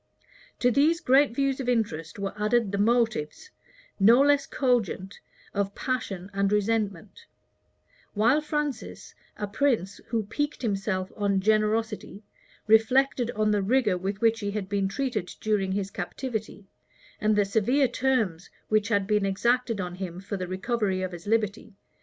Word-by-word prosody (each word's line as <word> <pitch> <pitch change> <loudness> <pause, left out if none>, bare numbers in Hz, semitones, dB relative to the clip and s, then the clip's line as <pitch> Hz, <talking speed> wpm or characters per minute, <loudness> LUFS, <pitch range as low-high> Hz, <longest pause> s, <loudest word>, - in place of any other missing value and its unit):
To 245 - +2
these 305 +7 +3
great 270 -5 +3
views 275 0 0
of 255 -2 -2
interest 170 -10 -1
were 200 -1 -3
added 215 0 +1
the 200 - -2
motives, 230 - 0 0.5
no 225 +6 +6
less 285 0 +3
cogent, 230 -7 -1 0.3
of 200 0 -2
passion 200 -7 -3
and 195 0 +1
resentment; 210 -3 -1 0.9
while 230 +8 +3
Francis, 295 -4 -4 0.2
a 210 - -2
prince 205 -3 0
who 225 -1 -1
piqued 290 +7 -3
himself 195 -3 -1
on 200 -2 +1
generosity, 215 +1 0 0.4
reflected 240 +3 +3
on 215 0 +2
the 205 -1 +2
rigor 215 -1 +2
with 195 +3 -4
which 225 0 +3
he 205 -3 -3
had 200 -2 -3
been 200 -1 0
treated 215 -4 -3
during 200 -3 0
his 200 0 -2
captivity, 215 +1 -5 0.5
and 215 0 +2
the 205 -1 +3
severe 240 +7 +2
terms 235 -9 -1 0.2
which 215 -1 +2
had 200 -3 +1
been 210 0 +1
exacted 235 +3 +1
of 180 -1 -4
him 180 -2 -5
for 200 +2 -5
the 185 -2 -4
recovery 190 0 -1
of 185 - -3
his 175 +2 -10
liberty. 215 -1 -1
215 Hz, 150 wpm, -26 LUFS, 195-240 Hz, 0.9 s, no